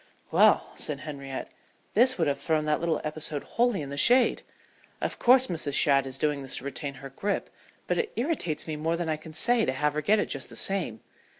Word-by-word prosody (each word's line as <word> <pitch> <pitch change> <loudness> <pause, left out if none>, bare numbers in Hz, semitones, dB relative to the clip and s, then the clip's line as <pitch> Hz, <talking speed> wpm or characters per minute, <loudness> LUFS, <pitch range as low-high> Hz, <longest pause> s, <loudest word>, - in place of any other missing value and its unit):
"Well," - - +4
said 145 -2 -3
Henriette, 140 -3 -7 0.4
"this 255 +4 +4
would 165 -4 +1
have 140 -1 -1
thrown 155 0 0
that 150 0 +1
little 165 -2 0
episode 150 -1 -3
wholly 235 -8 0
in 140 - -8
the 140 - -5
shade. 245 - +5 0.6
Of - - -4
course 255 +1 +6
Mrs. 155 - -2
Shadd 135 -2 +4
is 130 0 -6
doing 150 -1 0
this 135 - -1
to - - -5
retain 140 0 -5
her 135 +1 -9
grip, 200 +9 -3 0.3
but - - -1
it 460 -2 -2
irritates 235 - -1
me 155 - -4
more 165 +2 -1
than 170 -2 -3
I 155 - 0
can 155 +1 -12
say 240 +5 +3
to - - +1
have 150 +3 0
her 155 - -2
get 210 +9 +3
it 210 - +1
just - - -4
the - - -12
same. 180 - 0
155 Hz, 220 wpm, -27 LUFS, 140-200 Hz, 0.6 s, course